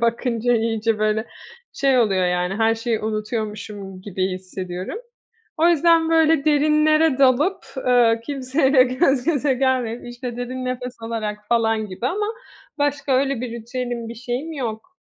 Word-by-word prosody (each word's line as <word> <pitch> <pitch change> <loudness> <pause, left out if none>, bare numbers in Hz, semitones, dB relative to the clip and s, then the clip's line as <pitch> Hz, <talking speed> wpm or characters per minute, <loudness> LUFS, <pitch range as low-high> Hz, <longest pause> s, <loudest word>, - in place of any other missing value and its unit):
Bakınca 235 0 +1
iyice, 225 -1 0
böyle, 215 +1 0 0.5
şey, 270 -2 +2
oluyor, 195 -6 +2
yani, 180 +1 0
her 225 +2 +2
şeyi 225 -1 -2
unutuyormuşum 215 -3 -4
gibi 190 -1 -2
hissediyorum. 185 - -6 0.6
O 330 +2 +4
yüzden, 330 0 +4
böyle, 320 -2 +4
derinlere 305 0 +3
dalıp, 280 +8 +3 0.2
eee, 235 -2 +4
kimseyle 270 -1 +3
gözgöze 270 +1 +1
gelmeyip, 250 -3 -1
işte, 240 0 -6
derin 255 +1 -4
nefes 250 0 -4
alarak 220 -2 -3
falan 225 -2 +1
gibi 200 +5 -4
ama 415 +8 -1 0.5
başka 285 -1 0
öyle 270 -1 +1
bir 250 - -4
ritüelim 235 0 -5
bir 230 - -7
şeyim 245 +7 -4
yok. 235 -1 -5
245 Hz, 135 wpm, -22 LUFS, 220-275 Hz, 0.6 s, O